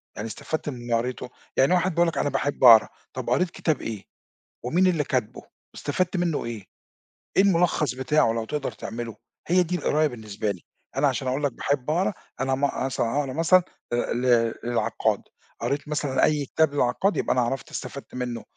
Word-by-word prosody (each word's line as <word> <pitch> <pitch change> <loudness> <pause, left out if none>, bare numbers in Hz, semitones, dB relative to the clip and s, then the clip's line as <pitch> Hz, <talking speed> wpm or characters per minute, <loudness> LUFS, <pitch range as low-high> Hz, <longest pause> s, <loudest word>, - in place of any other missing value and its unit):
يعني 105 - -4
استفدت 155 +7 -4
من 130 - -6
اللي 120 0 -3
قريتُه؟ 125 +2 -1 0.3
يعني 135 +6 +4
واحد 180 +1 +2
بيقول 170 +1 +3
لَك 160 -4 -2
أنا 145 - +1
باحب 140 -1 -2
أقرا، 115 -3 +9 0.3
طَب - - -4
قريت 180 -1 +2
كتاب 155 -5 -1
إيه؟ 110 -4 -5 0.6
ومين 175 +9 +3
اللي 165 -5 +2
كاتبُه؟ 125 -6 -2 0.3
استفدت 180 +6 -1
منُّه 175 -3 0
إيه؟ 115 -4 -6 0.7
إيه - - +8
المُلخَّص 170 -8 +2
بتاعه 130 -1 +2
لو 115 -1 -2
تقدر 145 +3 -3
تعملُه؟ 115 -1 -6 0.3
هي 180 +1 +4
دي 180 +2 -2
القراية 155 -3 +2
بالنسبة 110 -4 -4
لي، 90 -3 -8 0.4
أنا - - +4
علشان 130 - -1
أقول 130 +3 -1
لَك 145 - +2
باحب 140 -1 -1
أقرا، 185 +5 +1 0.3
أنا 135 0 +1
ما 140 +2 +2
أقر 130 - -3
مثلًا 120 -2 -1
اقرا 135 -3 -2
مثلًا 170 +4 +4 0.3
آآ 120 -1 0
ل 120 - -2 0.4
للعقّاد، 120 0 0 0.4
قريت 140 +1 -2
مثلًا 145 -3 0
أي 150 -2 +1
كتاب 155 +2 +1
للعقّاد، 145 +9 +1
يبقى - - +1
أنا 125 - +2
عرفت 135 +3 -2
استفدت 140 - -7
منُه، 125 -2 -4
140 Hz, 185 wpm, -25 LUFS, 120-160 Hz, 0.7 s, أقرا